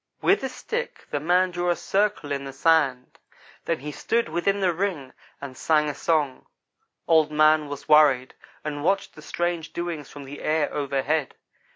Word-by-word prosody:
"With 395 -4 +2
a 265 - -1
stick 475 - -5
the 145 - -1
man 180 +4 +2
drew 175 0 -1
a 175 - +3
cricle 200 -7 -1
in 140 -1 -2
the 135 -1 -7
sand. 135 -4 +1 0.5
Then 165 -4 -1
he 150 +1 -5
stood 230 +6 -1
within 175 +5 0
the 185 -3 +2
ring 165 -8 -3 0.3
and 140 -2 -8
sang 150 +2 +2
a - - -3
song. 145 -3 -1 0.6
Old 160 -2 +4
man 155 0 +4
was 145 0 -8
worried 145 -4 +5 0.3
and 145 -1 -4
watched 195 +4 0
the 155 - -13
strange 170 +1 -3
doings 170 -5 -4
from 145 - -10
the 140 +2 -9
air 155 -1 0
overhead. 140 +1 -1
155 Hz, 175 wpm, -25 LUFS, 145-175 Hz, 0.6 s, worried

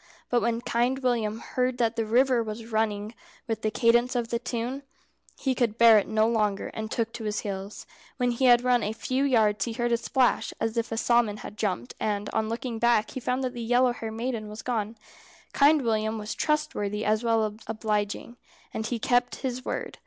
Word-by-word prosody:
But 240 -1 +3
when 230 +1 0
Kind 245 +2 0
William 225 -4 0
heard 250 +2 -2
that 230 -2 +1
the 225 -2 -1
river 250 +2 +3
was 220 0 -5
running 215 -1 -1 0.3
with 225 -1 -2
the 215 - +1
cadence 240 +3 +3
of 235 -2 -1
the 235 - -1
tune, 245 +3 -3 0.6
he 265 - 0
could 235 -3 0
bear 230 -2 +8
it - - -4
no 220 0 +2
longer, 210 -3 0
and 220 0 -5
took 230 0 -2
to 225 - -6
his 210 -1 -1
heels. 195 0 -6 0.3
When 245 -2 +1
he 240 +2 0
had 240 -1 +6
run 250 -1 +3
a 210 +1 -2
few 255 +4 -1
yards 215 -7 +2
he 235 - -4
heard 240 +1 -1
a 235 - +3
splash, 250 +2 +1
as 225 0 -1
if 230 0 -1
a 225 - -2
salmon 235 -3 +2
had 210 - -8
jumped, 185 - -2
and 205 -1 -2
on 220 0 -1
looking 230 0 -4
back 235 -2 +2
he - - -5
found 250 +1 -1
that 255 -1 -2
the 240 - -6
yellow 245 +2 +3
haired 225 -2 -6
maiden 225 -2 -3
was 215 +1 -8
gone. 225 -2 -2 0.6
Kind 290 0 +5
William 220 -1 0
was 210 0 -4
trustworthy 300 -10 -1
as 215 +2 +1
well 225 -2 +2
as 215 0 -6
obliging, 215 +1 -2 0.4
and 220 0 -3
he 240 - -2
kept 245 +2 +1
his 255 0 -3
word. - - -4
230 Hz, 210 wpm, -27 LUFS, 215-245 Hz, 0.6 s, bear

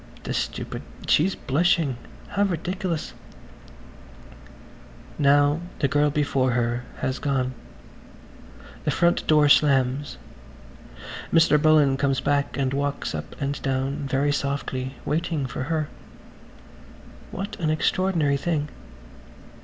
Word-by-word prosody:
The - - -3
stupid–she's 185 +6 -1
blushing! 155 -1 +1 0.3
How 200 - -1
ridiculous! 180 -2 -1
[Page - - -20 2.0
140] - - -2
Now 145 +2 +4 0.2
the 140 - +1
girl 145 +2 +2
before 140 -4 +1
her 120 0 0 0.2
has 130 +1 -1
gone; 130 -3 0 1.3
the - - 0
front 170 0 +2
door 150 -1 +5
slams. 140 -1 +3 1.1
Mr. 160 -2 +5
Bullen 150 -3 +4
comes 135 -1 +1
back 145 0 0
and 135 -1 0
walks 145 +1 -2
up - - -7
and 140 0 -2
down, 135 +1 -1
very 140 +2 +1
softly, 140 -2 -2
waiting 155 -1 -1
for 130 +1 -4
her. 155 -1 -1 1.4
What 200 +2 -5
an 160 -3 0
extraordinary 155 -2 +1
thing. 150 -1 -1
145 Hz, 110 wpm, -24 LUFS, 135-155 Hz, 2.0 s, door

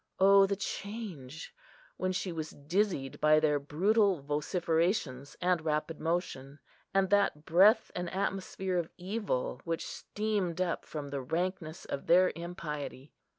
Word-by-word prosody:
O 195 0 +7
the 200 - 0
change, 195 - -6 0.4
when 185 - 0
she 185 0 -2
was 160 -2 -4
dizzied 150 -2 -1
by 155 0 +6
their 150 -2 +2
brutal 195 +6 +2
vociferations 150 - -1
and 180 -2 +1
rapid 155 0 -1
motion, 155 -5 -2 0.3
and 195 0 +2
that 200 -7 +2
breath 195 +7 +5
and 180 -1 -3
atmosphere 190 -1 -2
of 165 - -3
evil 180 - -2
which 165 -1 -2
steamed 205 -5 -2
up 180 -2 -1
from 145 -2 -6
the 140 -1 -2
rankness 170 +3 -3
of 140 - -5
their 180 +2 +6
impiety! 150 -5 -6
170 Hz, 135 wpm, -31 LUFS, 150-190 Hz, 0.4 s, O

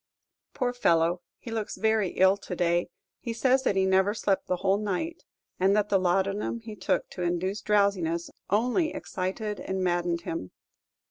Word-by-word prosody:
Poor 245 -1 0
fellow, 170 -6 +2 0.2
he 230 - -9
looks 220 -1 -3
very 220 -3 +2
ill 190 +1 +5
to 200 -2 -7
day. 175 0 +1 0.3
He 235 - -4
says 260 +3 +3
that 255 - +1
he 190 0 +3
never 190 +2 +3
slept 200 -3 0
the 180 - +1
whole 195 +2 +1
night, 215 - -3 0.3
and 190 +2 +4
that 210 0 +1
the 195 - +3
laudanum 195 +5 0
he 220 -1 -8
took 185 - 0
to 180 - -7
induce 180 +4 -1
drowsiness 195 -6 +1 0.2
only 250 - +2
excited 195 +2 -3
and 190 0 -3
maddened 175 -1 0
him. 165 - -5
195 Hz, 165 wpm, -27 LUFS, 180-215 Hz, 0.3 s, ill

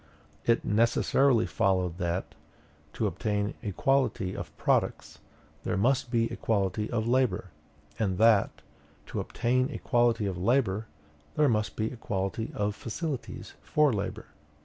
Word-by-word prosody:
It 115 0 +3
necessarily 115 +3 +3
followed 95 -2 0
that, 85 -1 -2 0.6
to - - -1
obtain 105 -1 -1
equality 110 -2 0
of - - -7
products, - - 0 0.4
there - - -1
must 125 +5 +2
be 115 -1 +1
equality 105 -4 -1
of 115 -2 -1
labor; 125 -7 +1 0.5
and 95 -5 0
that, 110 -1 +3 0.4
to - - -4
obtain 125 +2 0
equality 120 -6 +1
of 95 -3 -3
labor, 110 0 +1 0.5
there 150 -2 +4
must 105 -4 0
be 110 0 -1
equality 105 -1 -3
of 105 0 -1
facilities 135 +5 -5
for 150 -4 +2
labor. 100 - -3
110 Hz, 125 wpm, -28 LUFS, 100-120 Hz, 0.6 s, there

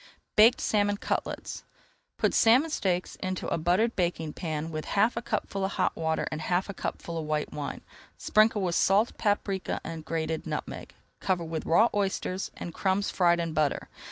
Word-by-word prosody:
BAKED 225 +4 +7
SALMON 205 -1 +1
CUTLETS - - -3 0.5
Put - - +1
salmon 255 +8 +5
steaks 185 - -1
into 185 -1 -3
a - - 0
buttered 185 +8 +2
baking 170 -4 -1
pan 160 -2 -4
with 155 -1 -4
half 220 +4 +4
a 235 - -2
cupful 200 -4 -2
of 190 - -1
hot 185 - 0
water 160 -1 -1
and 155 - -4
half 180 +4 0
a - - -3
cupful 170 -2 -4
of 155 - -4
white 155 -1 -1
wine. 145 -1 -5 0.4
Sprinkle 215 -1 +3
with 175 -2 0
salt, 200 +6 +3
paprika, 205 -2 0
and 165 -1 -6
grated 160 0 -3
nutmeg. - - -5 0.2
Cover 185 -3 0
with 160 -1 -4
raw 195 +8 +5
oysters 195 -2 -1
and 170 - -6
crumbs 195 +3 0
fried 175 -2 +3
in 165 -1 -2
butter. 150 -2 0
180 Hz, 175 wpm, -28 LUFS, 160-205 Hz, 0.5 s, BAKED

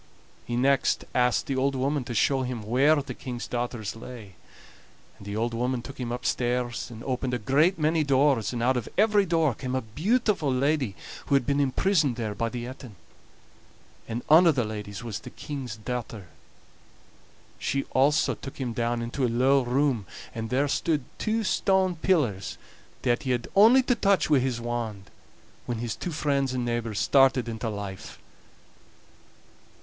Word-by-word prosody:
He 120 - -3
next 135 +2 +2
asked 125 -1 +2
the 135 - -2
old 135 +1 +1
woman 135 +1 0
to 120 - -5
show 135 +5 +2
him 125 -3 -4
where 130 +8 +4
the 145 -2 -3
King's 125 -3 -6
daughters 120 -4 -3
lay; 115 -4 -10 0.9
and 100 - -11
the 100 - -4
old 115 +2 -1
woman 125 +1 -1
took 135 - -10
him 120 -2 -3
upstairs 120 -1 -1
and 115 -1 -10
opened 130 -1 -2
a - - 0
great 145 - +2
many 155 0 +2
doors, 135 -6 +2
and 120 -2 -3
out 130 +1 +3
of 120 - -4
every 210 -1 +4
door 165 -5 +2
came 130 +2 -4
a 130 - 0
beautiful 180 - 0
lady 130 -4 0 0.3
who 140 - +3
had 135 -3 +2
been 140 +2 +1
imprisoned 145 0 +2
there 110 -3 -3
by 115 +2 -2
the 120 0 -5
Etin; 125 -3 -9 1.1
and 120 +1 -4
ane 165 +4 +7
o' - - +7
the 130 -5 0
ladies 105 -1 -6
was 110 -3 -4
the - - -10
King's 135 -7 -6
daughter. 110 -4 -5 1.3
She 135 0 -1
also 140 +3 +3
took 135 - -9
him 125 -4 -3
down 120 0 -1
into 120 +3 -3
a 125 - +3
low 130 +4 +3
room, 125 -4 0 0.3
and 115 -1 -4
there 135 +3 +1
stood 150 0 0 0.2
two 220 +1 0
stone 190 -2 +2
pillars 140 - 0 0.5
that 120 -2 +1
he 130 - -4
had 120 -2 0
only 230 +6 +7
to 250 - +2
touch 200 -7 +2
wi' 145 - +6
his 125 -2 -1
wand, 115 -4 -4 0.6
when 120 - -2
his 115 -1 -3
two 180 - -5
friends 140 -4 0
and 125 -1 -1
neighbors 115 -3 -2
started 135 -2 +4
into 115 0 -3
life. 100 -2 -7
125 Hz, 175 wpm, -26 LUFS, 115-145 Hz, 1.3 s, ane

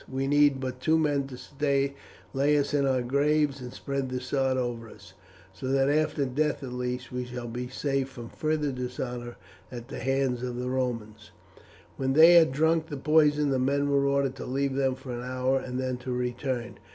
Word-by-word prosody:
We 135 +1 -1
need 145 -1 +4
but 130 -1 -4
two 160 +5 +3
men 145 -3 +1
to 140 +1 -1 0.4
lay 145 +2 +3
us 145 0 0
in 140 -1 +2
our 130 -2 +1
graves 140 +2 +1
and 125 -1 -7
spread 140 0 -3
the 130 0 -2
sods 130 0 0
over 120 -2 -3
us; 95 -3 -15 0.4
so 95 +8 -6
that 135 +1 +2
after 150 -1 +1
death 145 +3 -1
at 125 -2 -6
least 125 0 -4
we 125 0 -3
shall 125 -1 -6
be 125 +2 -4
safe 135 +1 -1
from 120 -3 -9
further 155 -2 -1
dishonour 125 -1 -5 0.4
at 120 0 -8
the - - -6
hands 135 -1 0
of 125 -1 -3
the 125 +1 -3
Romans." 115 -5 -3 0.7
When 135 0 0
they 160 +4 +8
had 165 -5 +7
drunk 160 +3 +2
the 145 -3 -5
poison 150 0 +3
the 130 - +1
men 140 +2 +1
were 140 0 +3
ordered 140 -1 +1
to - - -6
leave 135 +1 0
them 135 -1 +1
for 130 -1 -9
an 120 0 -4
hour 130 +1 0
and 125 -1 -5
then 130 -1 -2
to 125 +1 -6
return. 125 0 -3
130 Hz, 200 wpm, -28 LUFS, 125-140 Hz, 0.7 s, they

